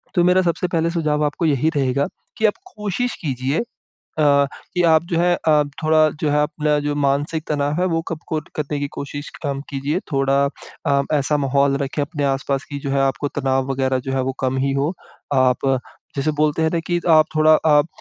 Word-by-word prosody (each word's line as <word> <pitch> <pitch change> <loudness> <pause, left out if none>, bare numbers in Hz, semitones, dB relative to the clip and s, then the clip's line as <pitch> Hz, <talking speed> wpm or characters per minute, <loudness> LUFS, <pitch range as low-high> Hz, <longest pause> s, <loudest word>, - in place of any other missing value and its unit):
तो 175 - +4
मेरा 180 +1 +4
सबसे 175 0 0
पहले 165 -1 0
सुझाव 155 -3 0
आपको 150 +3 -1
यही 155 0 +2
रहेगा 140 0 +1 0.3
कि 220 - +1
आप 210 - +4 0.2
कोशिश 210 +4 -2
कीजिए 135 0 -1 0.6
अ, 140 -1 +4 0.3
कि 180 - +2
आप 160 -2 +5
जो 170 - +1
है 175 +1 +3
अ, 150 -1 +5 0.2
थोड़ा 155 0 +4
जो 150 - +1
है 150 0 +3
अपना 150 0 0
जो 145 - 0
मानसिक 145 +3 0
तनाव 145 +2 0
है 185 - +2
वो 165 -2 0
कब 165 - -4
को 155 -2 -1 0.2
करने 150 -1 -2
की 145 - -2
कोशिश 145 +1 -6
कम 140 -2 -2
कीजिए 145 +5 -1
थोड़ा 135 0 +2 0.4
अ, 140 0 +3
ऐसा 145 +1 +2
माहौल 140 0 +2
रखें 145 +2 -3
अपने 145 0 -3
आस-पास 135 0 -1
कि 145 - -4
जो 140 - -1
है 140 0 +1
आपको 135 +2 0
तनाव 135 0 0
वग़ैरह 130 -1 0
जो 135 - -1
है 135 - 0
वो 135 +1 -1
कम 130 0 0
ही 135 - +1
हो। 140 +6 0 0.4
आप 130 0 +2 0.5
जैसे 140 +3 +1
बोलते 150 +1 +1
हैं 160 - +2
ना 170 - +1
कि, 175 -1 0
आप 155 -1 +6
थोड़ा 155 0 +4 0.2
आप 150 -1 +5
145 Hz, 205 wpm, -21 LUFS, 140-160 Hz, 0.6 s, आप